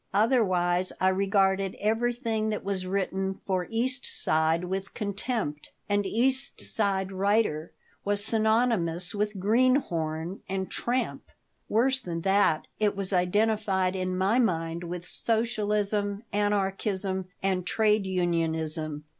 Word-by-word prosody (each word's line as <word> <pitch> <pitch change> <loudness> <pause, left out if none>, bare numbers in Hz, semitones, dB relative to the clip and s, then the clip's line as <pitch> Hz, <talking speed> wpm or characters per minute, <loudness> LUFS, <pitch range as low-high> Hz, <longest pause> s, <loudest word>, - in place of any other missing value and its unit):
Otherwise 185 -6 +2
I 185 - +4
regarded 195 0 +1
everything 225 0 0
that 210 - -3
was 190 -2 -2
written 190 0 -1
for 185 -2 -1
the 225 - -5
East 260 +2 0
Side 160 +2 +1
with 190 +2 -4
contempt, 200 - -3
and 205 -1 +1
"East 260 +6 +1
Side 195 -3 0
writer" 195 -5 +1 0.3
was 205 0 0
synonymous 220 -6 +1
with 210 0 -1
"greenhorn" 185 - +1
and 190 0 -3
"tramp." 250 +1 -2 0.4
Worse 260 +4 +2
than 170 -5 -4
that, 190 -4 +2
it 210 -2 +2
was 195 0 -2
identified 190 0 +1
in 185 -1 -2
my 195 +6 +2
mind 165 -6 0
with 175 0 -5
socialism, 210 -2 0
anarchism, 195 -2 0 0.2
and 190 -2 +1
trade 215 -2 +2
unionism. 160 -4 -1
195 Hz, 120 wpm, -27 LUFS, 180-215 Hz, 0.4 s, I